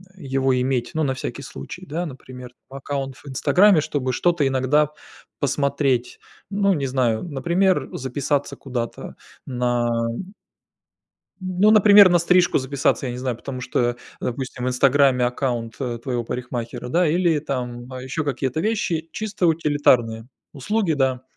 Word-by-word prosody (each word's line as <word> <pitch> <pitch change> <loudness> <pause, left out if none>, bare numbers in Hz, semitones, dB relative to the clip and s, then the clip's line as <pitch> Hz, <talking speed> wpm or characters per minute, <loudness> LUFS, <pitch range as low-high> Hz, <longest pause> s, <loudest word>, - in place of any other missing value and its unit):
его 135 -5 0
иметь, 125 -1 -1
ну, 160 - +1
на 135 - 0
всякий 130 - -6
случай, 170 - -9
да, 170 +3 -3
например, 125 -2 -10 0.2
там 135 - -8
аккаунт 135 -1 -4
в - - -16
"Инстаграме", 185 +7 +4
чтобы 135 -3 -2
что-то 165 +3 +1
иногда 135 +3 +2 0.5
посмотреть. 140 -3 0 0.3
Ну, 200 -1 +2
не 140 -4 -1
знаю, 125 -4 0
например, 170 +1 0
записаться 140 +2 -2
куда-то 120 -4 -5 0.3
на 120 -2 0 0.2
м 185 - -6 1.1
ну, 185 +3 +2
например, 205 -2 +8
на 175 -1 +4
стрижку 180 +1 +3
записаться, 135 0 0
я 120 - -3
не 125 - -6
знаю, 125 -2 -2
потому 130 +1 -7
что, 120 -1 0 0.2
допустим, 125 0 -4
в 130 - +1
"Инстаграме" 130 0 +3
аккаунт, 120 -2 -2
э, 120 -3 -3
твоего 120 -1 -3
парикмахера, 120 0 -5
да, 170 +6 +2
или 170 -1 +2
там 125 -4 -4
ещё 130 +5 -3
какие-то 135 +1 -2
вещи, 170 -6 -1
чисто 210 -4 -1
утилитарные 130 -8 +2 0.2
услуги, 195 - -1
да. 130 -3 0
135 Hz, 145 wpm, -22 LUFS, 125-160 Hz, 1.1 s, например